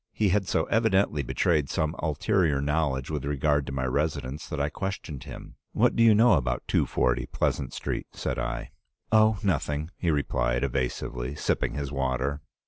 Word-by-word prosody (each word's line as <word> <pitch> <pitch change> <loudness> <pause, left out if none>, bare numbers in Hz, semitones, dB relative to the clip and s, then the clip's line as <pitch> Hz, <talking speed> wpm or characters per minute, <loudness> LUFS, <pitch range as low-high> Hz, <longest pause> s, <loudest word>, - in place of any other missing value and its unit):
He 105 -2 +2
had 95 0 +1
so 80 - +1
evidently 100 -8 +2
betrayed 70 +3 +1
some 80 +2 -1
ulterior 80 -1 +1
knowledge 70 -1 0
with 75 -4 -2
regard 75 0 +1
to - - -4
my 65 -1 -2
residence 70 +1 -2
that 75 - -3
I 70 - +1
questioned 90 -6 -5
him. - - -10 0.2
"'What - - +3
do - - +2
you 115 -2 +7
know 115 +1 +6
about 60 -5 0
240 60 +1 +1
Pleasant - - -1
Street?' - - -4
said - - -3
I. 60 -1 -4 0.4
"'Oh, 110 0 +5
nothing,' 75 -3 -1
he 90 - -1
replied, 65 -4 0
evasively, 65 0 -2
sipping 80 - -1
his 70 -1 -3
water. 70 +1 -1
75 Hz, 165 wpm, -27 LUFS, 65-85 Hz, 0.4 s, you